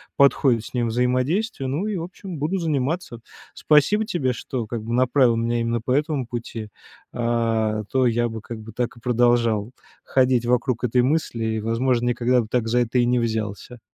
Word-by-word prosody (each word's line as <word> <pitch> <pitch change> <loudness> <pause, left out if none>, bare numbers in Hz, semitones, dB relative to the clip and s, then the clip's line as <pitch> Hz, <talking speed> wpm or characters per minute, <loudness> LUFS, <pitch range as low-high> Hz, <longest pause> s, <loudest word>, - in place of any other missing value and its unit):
подходит 135 -4 +3
с - - -11
ним 120 -2 0
взаимодействие, 130 - 0
ну 150 +10 -2
и, 205 -3 -2
в 165 - -4
общем, 180 -1 -8
буду 165 +7 -1
заниматься. 150 -4 -2 0.3
Спасибо 155 +9 +3
тебе, 140 -11 -1
что, 120 -1 -4
как 115 -1 -5
бы, 115 - -4
направила 125 -1 +3
меня 115 +1 0
именно 115 0 -1
по 120 - -3
этому 145 -1 0
пути, 115 -2 -6 0.4
а 115 -2 0
то 130 -2 +3
я 120 +1 +1
бы, 110 0 -6
как 115 +1 -8
бы, 115 +1 -10
так 120 +2 -3
и 115 - -16
продолжал 120 -2 +2 0.3
ходить 130 -2 +2
вокруг 125 0 +1
этой 125 +1 +2
мысли 130 -3 0
и, - - -1
возможно, 120 +2 0
никогда 120 +1 +2
бы 110 - -7
так 120 -2 0
за 120 +2 +2
это 120 +1 +1
и 120 - +3
не 125 0 +2
взялся. 110 +1 -3
120 Hz, 190 wpm, -23 LUFS, 115-135 Hz, 0.4 s, подходит